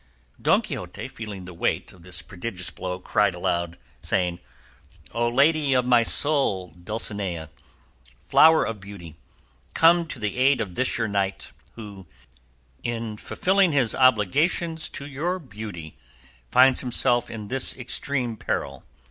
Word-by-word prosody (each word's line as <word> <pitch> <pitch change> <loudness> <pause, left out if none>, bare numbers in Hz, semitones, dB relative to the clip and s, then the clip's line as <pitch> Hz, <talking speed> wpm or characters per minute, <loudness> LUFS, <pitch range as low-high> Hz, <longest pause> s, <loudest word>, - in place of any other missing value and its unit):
Don - - +3
Quixote, - - -6
feeling 105 -4 -8
the 90 - -10
weight 85 - -2
of 90 - -18
this 90 +1 -3
prodigious 95 -2 -6
blow, 90 -1 -5
cried 95 +1 +1
aloud, 85 -1 -2 0.2
saying, 90 -2 -1 0.7
"O 120 +1 0
lady 145 +3 +3
of 125 -1 +2
my 125 -1 +5
soul, 115 - +3
Dulcinea, 90 -3 -4 0.7
flower 160 0 +6
of 115 -2 -5
beauty, 95 -5 -11 0.6
come 170 +1 +5
to 150 - -7
the 105 0 -3
aid 135 +1 +3
of 95 -5 -4
this 130 +7 0
your 115 -2 0
knight, 100 -1 -2 0.2
who, 100 -5 -11 0.7
in 115 -2 -4
fulfilling 190 - +1
his 125 -6 +2
obligations 145 - +2
to 140 - -5
your 150 +6 -2
beauty, 105 - -9 0.5
finds 130 - +5
himself 120 -1 +1
in 105 -3 -7
this 135 0 +3
extreme 125 -1 -1
peril." 70 -9 -4
115 Hz, 135 wpm, -24 LUFS, 95-135 Hz, 0.7 s, flower